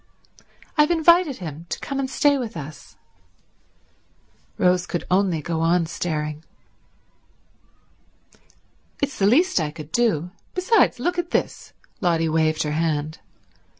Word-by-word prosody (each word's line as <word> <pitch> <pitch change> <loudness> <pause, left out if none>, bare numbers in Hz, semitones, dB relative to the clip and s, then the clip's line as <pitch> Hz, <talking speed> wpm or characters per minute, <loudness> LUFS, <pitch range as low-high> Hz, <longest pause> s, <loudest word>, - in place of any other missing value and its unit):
"I've 300 - +5
invited 340 -2 +4
him 165 -1 -8
to - - -3
come 275 -1 -4
and 265 -1 -2
stay 285 +2 +3
with 235 -6 -4
us." 150 -1 -10 1.6
Rose 180 -1 +2
could 175 - -3
only 185 -5 +2
go 165 0 -2
on 170 +1 +2
staring. 155 -2 -3 2.6
"It's 280 -1 -2
the 195 - +4
least 315 - +3
I 155 -2 -1
could 155 0 -10
do. 180 -8 +1 0.2
Besides—look 360 - +2
at 345 -1 -3
this." - - -2 0.3
Lotty 165 -3 +2
waived 155 0 +1
her 150 - -2
hand. 155 0 -1
175 Hz, 120 wpm, -23 LUFS, -, 2.6 s, I've